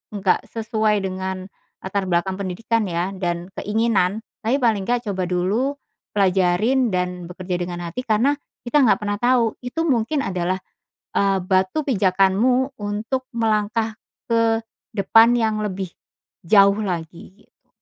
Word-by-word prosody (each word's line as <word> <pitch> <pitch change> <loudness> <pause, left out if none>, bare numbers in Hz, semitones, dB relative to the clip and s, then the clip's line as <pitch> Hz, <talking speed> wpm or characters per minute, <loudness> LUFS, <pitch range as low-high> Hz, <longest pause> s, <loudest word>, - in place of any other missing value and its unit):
enggak 195 -2 +2
sesuai 215 -2 0
dengan 190 0 -4 0.3
latar 190 0 -2
belakang 185 +2 0
pendidikan 210 +3 -1
ya, 175 +2 -1
dan 175 0 -3
keinginan 215 -2 +1 0.2
tapi 230 +4 +2
paling 220 -4 +2
nggak 240 -1 0
coba 190 -1 -2
dulu, 200 +10 0 0.4
pelajarin 195 +6 +3
dan 180 -1 -2
bekerja 180 0 -4
dengan 175 0 -5
hati. 170 +7 -5
Karena, 235 +3 +2 0.3
kita 250 +5 +2
nggak 235 - +4
pernah 205 -1 -2
tahu 240 -2 +2
itu 250 +7 -2
mungkin 255 +2 +1
adalah, 185 0 -1 0.6
eee, 195 -1 +2
batu 185 +7 +1
pijakanmu 210 +5 +2
untuk 210 +6 -2
melangkah 220 0 0 0.3
ke 230 -1 +2 0.4
depan 225 +3 +5
yang 220 -2 +1
lebih 190 -2 -3 0.6
jauh 200 +2 +6
lagi, 170 -3 -5
gitu. - - -30
205 Hz, 130 wpm, -22 LUFS, 185-230 Hz, 0.6 s, jauh